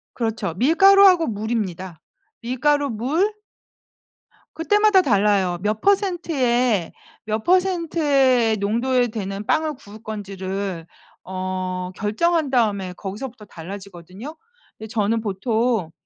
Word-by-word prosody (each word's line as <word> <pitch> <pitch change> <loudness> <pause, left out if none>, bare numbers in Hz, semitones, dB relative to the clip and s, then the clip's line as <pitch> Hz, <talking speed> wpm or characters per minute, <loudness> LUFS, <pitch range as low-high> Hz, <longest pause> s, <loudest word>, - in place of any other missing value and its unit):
그렇죠. 225 -7 -2
밀가루하고 365 - +5
물입니다. 200 -6 -4 0.4
밀가루 280 +4 +1
물 290 - 0 1.2
그때마다 415 +3 +4
달라요. 200 - +2
몇 215 +2 -1
퍼센트의 275 - +1 0.3
몇 215 0 -2
퍼센트의 300 - +2
농도에 240 +5 +1
되는 205 -2 -5
빵을 315 +2 +1
구울 215 -4 -14
건지를 195 -4 -5 0.4
어 185 -1 -4
결정한 310 +9 0
다음에 205 -7 0
거기서부터 210 +4 -7
달라지거든요. 190 - -10 0.4
근데 220 - -8
저는 225 0 0
보통 220 -2 -1
225 Hz, 260 characters per minute, -22 LUFS, 195-290 Hz, 1.2 s, 밀가루하고